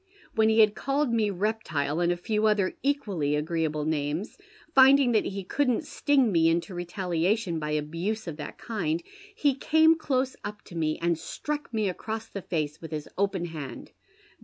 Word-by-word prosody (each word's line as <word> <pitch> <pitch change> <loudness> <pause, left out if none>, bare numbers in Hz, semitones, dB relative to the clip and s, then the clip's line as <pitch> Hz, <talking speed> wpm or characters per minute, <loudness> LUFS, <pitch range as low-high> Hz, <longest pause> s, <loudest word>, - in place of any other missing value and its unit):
When 220 0 +3
he 220 0 +5
had 215 -1 +5
called 275 0 0
me 220 -2 +2
reptile, 180 -7 -1
and 175 0 +2
a 175 - -1
few 215 +4 0
other 205 -3 +2
equally 205 - 0
agreeable 155 -1 -1
names, 155 +5 -2 0.4
finding 270 -1 +7
that 220 -2 +2
he 195 0 -4
couldn't 255 - 0
sting 285 -5 +2
me 165 -2 +4
into 170 +4 -1
retaliation 175 +1 -1
by 150 -1 -3
abuse 165 +9 -2
of 165 - -5
that 150 - -7
kind, 170 -8 -2 0.3
he 285 -2 +2
came 315 +4 +4
close 265 -4 -1
up 210 +1 -6
to 175 - -12
me 155 -2 0
and 170 -1 0
struck 295 - -5
me 215 -3 0
across 220 +4 -4
the 200 - -6
face 155 -3 -3
with 165 - -7
his 150 -2 -5
open 195 -2 0
hand. 155 -5 -7
195 Hz, 175 wpm, -27 LUFS, 165-225 Hz, 0.4 s, finding